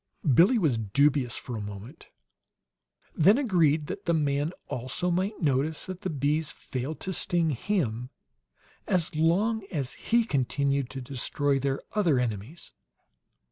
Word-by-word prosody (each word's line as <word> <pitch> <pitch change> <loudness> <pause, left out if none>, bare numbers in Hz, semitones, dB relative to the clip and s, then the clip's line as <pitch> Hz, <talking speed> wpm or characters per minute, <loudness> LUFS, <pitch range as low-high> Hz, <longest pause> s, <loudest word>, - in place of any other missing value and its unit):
Billie 190 - +6
was 150 - +2
dubious 130 +4 +2
for 125 - -6
a 110 - -4
moment; 105 +8 -9 1.1
then 195 +9 +5
agreed 165 - +2
that 195 +6 -6
the 170 - +2
man, 145 0 0 0.2
also, 130 +9 -2
might 190 +5 -1
notice 145 +2 0
that 185 -1 -7
the 185 - -2
bees 150 +1 0
failed 135 +2 -5
to 190 - -3
sting 170 -3 0
him 125 - -1 0.8
as 170 -4 +1
long 195 +8 +2
as 140 -7 -3
he 235 0 +1
continued 140 - 0
to 135 - -6
destroy 140 +2 0
their 135 0 -1
other 175 -10 +2
enemies. 120 - -3
150 Hz, 140 wpm, -27 LUFS, 130-175 Hz, 1.1 s, Billie